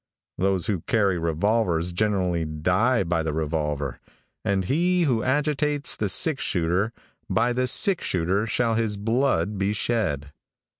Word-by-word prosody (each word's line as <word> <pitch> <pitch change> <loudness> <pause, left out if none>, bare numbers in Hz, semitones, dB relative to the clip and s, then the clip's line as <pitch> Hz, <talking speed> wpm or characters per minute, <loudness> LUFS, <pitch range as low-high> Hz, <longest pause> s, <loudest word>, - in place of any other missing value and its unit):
Those 95 -1 +1
who 95 -6 -1
carry 100 -7 +2
revolvers 85 +1 0
generally 90 -4 0
die 90 +10 +1
by 85 -1 0
the 80 -1 -2
revolver, 75 -4 -2 0.4
and 95 -2 0
he 175 - +2
who 125 -8 +1
agitates 145 +2 0
the 105 - -1
six 140 - +1
shooter, 90 +5 0 0.4
by 120 +2 +2
the 125 +1 0
six 195 - +2
shooter 95 +5 0
shall 115 0 +1
his 110 -2 -1
blood 105 -4 0
be 100 +1 +1
shed. 90 - -1
100 Hz, 140 wpm, -25 LUFS, 85-120 Hz, 0.4 s, carry